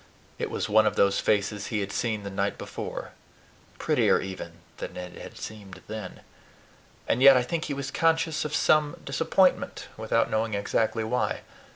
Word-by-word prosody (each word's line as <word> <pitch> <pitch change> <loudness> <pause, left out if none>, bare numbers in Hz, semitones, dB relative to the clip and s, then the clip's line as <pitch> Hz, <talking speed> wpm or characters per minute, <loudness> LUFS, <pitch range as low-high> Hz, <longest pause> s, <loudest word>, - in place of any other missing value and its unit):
It - - -2
was - - -2
one 110 0 +5
of - - 0
those 100 0 +3
faces 105 -1 0
he 105 -3 -1
had 100 0 -4
seen 110 -2 -1
the 100 - -5
night 100 +1 -1
before, - - -6 0.7
prettier - - +3
even 95 -3 -6 0.2
than - - -6
it 90 0 -8
had - - -10
seemed 100 -3 -9
then; 105 -4 -7 0.9
and 125 - +1
yet 135 -1 +9
I 125 - +2
think 165 +5 -2
he 145 - -3
was 135 -1 -4
conscious 165 -1 +1
of 150 - -3
some 150 -1 +3
disappointment, - - +1
without 110 +1 +1
knowing 110 0 0
exactly 110 +2 0
why. 125 +3 -1
110 Hz, 170 wpm, -27 LUFS, 100-135 Hz, 0.9 s, yet